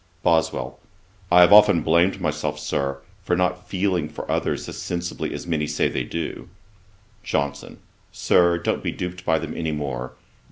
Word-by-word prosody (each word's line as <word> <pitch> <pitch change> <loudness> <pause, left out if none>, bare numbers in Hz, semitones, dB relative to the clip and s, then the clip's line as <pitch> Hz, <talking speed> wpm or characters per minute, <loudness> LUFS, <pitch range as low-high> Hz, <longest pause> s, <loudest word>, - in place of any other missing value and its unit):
BOSWELL. 80 -1 0 0.5
'I 90 0 +7
have 90 +2 +7
often 105 -4 +7
blamed 85 +4 +3
myself, 75 -4 -2
Sir, 70 0 -2 0.2
for 90 0 0
not 90 0 -1
feeling 90 -5 0
for - - -7
others - - -1
as - - -7
sensibly 85 0 -4
as - - -6
many 80 -3 -1
say 75 0 0
they - - -2
do.' 85 - -5 0.7
JOHNSON. 70 0 -3 0.3
'Sir, 85 -1 +3
don't 85 - -1
be - - -2
duped 90 0 -6
by 80 - +2
them - - -5
any 80 -1 -2
more. 70 -4 -4
85 Hz, 160 wpm, -23 LUFS, 75-90 Hz, 0.7 s, I